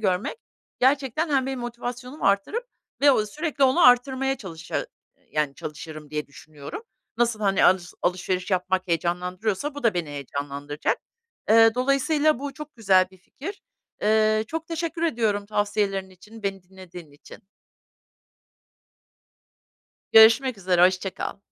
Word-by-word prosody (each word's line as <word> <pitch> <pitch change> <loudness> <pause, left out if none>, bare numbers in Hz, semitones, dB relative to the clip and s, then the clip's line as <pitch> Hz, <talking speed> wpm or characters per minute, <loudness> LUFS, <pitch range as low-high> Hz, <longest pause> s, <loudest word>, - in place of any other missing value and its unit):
görmek 190 - -1 0.4
gerçekten 275 +4 +2
hem 265 -2 +2
benim 265 -2 -3
motivasyonumu 245 +3 -6
arttırıp 200 - +1 0.4
ve 285 0 +7
o 215 -5 +2
sürekli 295 +3 -1
onu 265 +7 +3
arttırmaya 265 +2 +3
çalışa 165 -7 -5 0.5
yani, 150 -2 0
çalışırım 155 0 -8
diye 150 0 -3
düşünüyorum. 145 - -10 0.4
Nasıl, 235 -2 +1
hani, 195 -2 +2
alış 180 -1 +3
alışveriş 185 +1 -1
yapmak 185 0 0
heyecanlandırıyorsa 180 - -2
bu 290 - -7
da 225 -5 +2
beni 170 -4 -2
heyecanlandıracak. 145 +1 -3 0.5
Eee, 225 0 +6
dolayısıyla 275 +3 +2
bu 280 0 -5
çok 300 0 -10
güzel 190 -4 +4
bir 190 - -19
fikir. 320 - -9 0.4
Eee, 215 0 +3
çok 325 0 -4
teşekkür 330 0 -4
ediyorum 220 -9 0
tavsiyelerin 205 -2 -1
için, 210 +4 -15
beni 195 -2 -3
dinlediğin 180 -4 -13
için. 145 - -14 2.7
Görüşmek 225 +2 +7
üzere. 180 -2 +4
Hoşça 185 +1 0
kal. - - -5
210 Hz, 130 wpm, -24 LUFS, 180-265 Hz, 2.7 s, ve